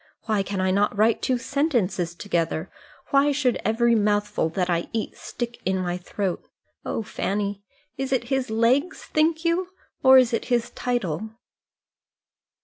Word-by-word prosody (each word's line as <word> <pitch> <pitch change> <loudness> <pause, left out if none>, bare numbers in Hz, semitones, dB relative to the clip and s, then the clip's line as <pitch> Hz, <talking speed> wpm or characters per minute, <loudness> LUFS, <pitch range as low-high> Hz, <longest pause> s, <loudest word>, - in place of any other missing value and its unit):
Why 215 -2 +1
can 195 0 -3
I 185 0 +2
not 205 +1 +1
write 220 +2 +3
two 255 - +1
sentences 220 - 0
together? 170 -3 -2 0.4
Why 280 +1 +4
should 265 -4 +1
every 235 +2 +3
mouthful 205 -5 +1
that 180 +2 -1
I 170 -1 0
eat 225 -1 -3
stick 240 -1 -6
in 190 +1 0
my 180 -1 -1
throat? 180 +1 -3 0.4
Oh, 225 - -3
Fanny, 200 -1 -2 0.4
is 270 -1 -2
it 260 -3 +2
his 265 -3 0
legs, 240 +10 +1
think 320 +2 +1
you, 350 +2 +1 0.3
or 265 0 +8
is 250 -2 +4
it 230 - 0
his 240 -2 0
title?" 220 -6 -2
220 Hz, 150 wpm, -24 LUFS, 190-260 Hz, 0.4 s, or